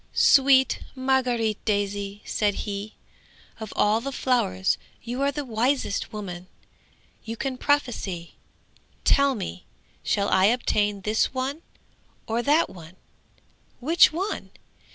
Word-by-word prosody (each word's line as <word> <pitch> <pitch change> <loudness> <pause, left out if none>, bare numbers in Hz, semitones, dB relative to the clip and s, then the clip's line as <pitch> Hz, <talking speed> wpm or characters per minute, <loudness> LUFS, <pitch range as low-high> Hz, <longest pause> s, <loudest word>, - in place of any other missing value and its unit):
"Sweet 265 -1 +5 0.2
Margaret 250 -5 0
Daisy," 205 0 -2
said 205 -2 0
he, 205 +1 -5 0.6
"of 220 -2 -7
all 215 +2 +3
the 275 +3 -4
flowers 170 - 0 0.2
you 245 +3 -4
are 280 0 +2
the 285 +1 -4
wisest 245 -1 -1
woman! 185 -4 -7 0.8
You 225 +1 -6
can 265 +1 -3
prophesy! 245 - -1 0.7
Tell 280 -1 +4
me, 90 - -6 0.4
shall 200 -1 0
I 190 - +4
obtain 210 -3 +1
this 215 +6 0
one 270 +5 -2 0.6
or 230 +1 -1
that 295 +6 +3
one? 170 -1 -13 0.8
Which 315 +7 +5
one? 375 +6 -3
225 Hz, 115 wpm, -25 LUFS, 200-265 Hz, 0.8 s, Sweet